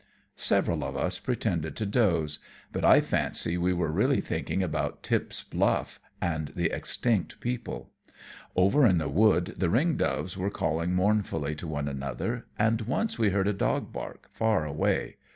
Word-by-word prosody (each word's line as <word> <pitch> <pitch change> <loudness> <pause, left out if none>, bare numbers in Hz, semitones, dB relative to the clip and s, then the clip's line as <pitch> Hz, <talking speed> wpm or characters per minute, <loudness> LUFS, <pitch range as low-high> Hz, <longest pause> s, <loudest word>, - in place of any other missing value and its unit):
Several - - +1
of - - -4
us - - -1
pretended 95 -10 -2
to 110 - -2
doze, 85 -9 +1 0.3
but - - -3
I - - +7
fancy 85 - 0
we 90 +1 +1
were 85 -3 0
really - - +2
thinking 95 - -2
about 90 - -2
Tip's - - -1
Bluff - - 0 0.2
and 80 -3 -1
the 85 -1 0
extinct 115 -7 -1
people. 120 -1 -4 0.6
Over 100 +11 +4
in 95 -4 +4
the 80 - -1
wood 95 +2 +3
the 90 - +2
ring 145 - +2
doves 95 - -1
were 95 +1 -1
calling 85 -1 -1
mournfully 90 -6 +1
to 75 +3 -6
one 75 -2 -2
another, 70 - -3
and 115 +1 +2
once 130 - -1
we 110 -3 +4
heard 95 0 +1
a 105 - +2
dog 100 - -1
bark, - - -7
far 110 -8 +1
away. 75 +1 -1
90 Hz, 165 wpm, -28 LUFS, 80-110 Hz, 0.6 s, I